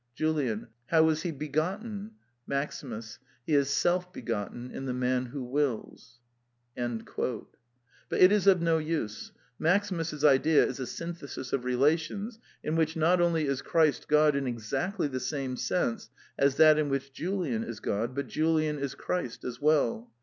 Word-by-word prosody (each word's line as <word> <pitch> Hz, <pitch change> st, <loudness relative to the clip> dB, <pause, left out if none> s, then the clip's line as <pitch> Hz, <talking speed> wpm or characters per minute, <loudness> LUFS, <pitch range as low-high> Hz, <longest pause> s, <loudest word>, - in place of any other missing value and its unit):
JULIAN. 140 Hz, -9 st, -1 dB, 0.2 s
How 160 Hz, -1 st, +5 dB
is 155 Hz, 0 st, 0 dB
he 175 Hz, -, -2 dB
begotten? 190 Hz, -, -3 dB, 0.3 s
MAXIMUS. 125 Hz, -5 st, -4 dB, 0.3 s
He 155 Hz, -, -1 dB
is 140 Hz, -1 st, +3 dB
self 180 Hz, +5 st, +1 dB
begotten 120 Hz, -, -4 dB
in 135 Hz, -, -6 dB
the 125 Hz, -2 st, -2 dB
man 125 Hz, 0 st, 0 dB
who 135 Hz, +2 st, -5 dB
wills. 125 Hz, -2 st, -3 dB, 0.6 s
But 120 Hz, -2 st, -3 dB, 1.1 s
it 185 Hz, +1 st, +8 dB
is 205 Hz, -2 st, +2 dB
of 185 Hz, -3 st, +6 dB
no 165 Hz, -1 st, +3 dB
use. 155 Hz, -9 st, -3 dB, 0.3 s
Maximus's 165 Hz, -4 st, +1 dB
idea 150 Hz, +2 st, +5 dB
is -, -, -4 dB
a 130 Hz, -, -3 dB
syn 170 Hz, +6 st, -5 dB
thesis 140 Hz, -5 st, -8 dB
of 125 Hz, -2 st, 0 dB
relations 160 Hz, -, 0 dB, 0.2 s
in 155 Hz, -, -1 dB
which 160 Hz, -1 st, +1 dB
not 170 Hz, +3 st, +3 dB
only 165 Hz, -3 st, +2 dB
is 140 Hz, -2 st, -1 dB
Christ 160 Hz, -3 st, +2 dB
God 150 Hz, -1 st, +4 dB
in 140 Hz, -1 st, -1 dB
exactly 135 Hz, -, -2 dB
the 130 Hz, -2 st, -3 dB
same 130 Hz, 0 st, -3 dB
sense 125 Hz, -3 st, -1 dB, 0.3 s
as 140 Hz, -1 st, +2 dB
that 155 Hz, -1 st, +7 dB
in 150 Hz, -2 st, +1 dB
which 135 Hz, 0 st, -2 dB
Julian 165 Hz, -, -2 dB
is 115 Hz, -3 st, -6 dB
God, 115 Hz, +5 st, -2 dB
but 140 Hz, -, -2 dB
Julian 155 Hz, -1 st, +1 dB
is 140 Hz, -1 st, -3 dB
Christ 175 Hz, -10 st, -3 dB
as 125 Hz, +1 st, -6 dB
well. 125 Hz, -6 st, +2 dB
145 Hz, 160 wpm, -29 LUFS, 125-165 Hz, 1.1 s, it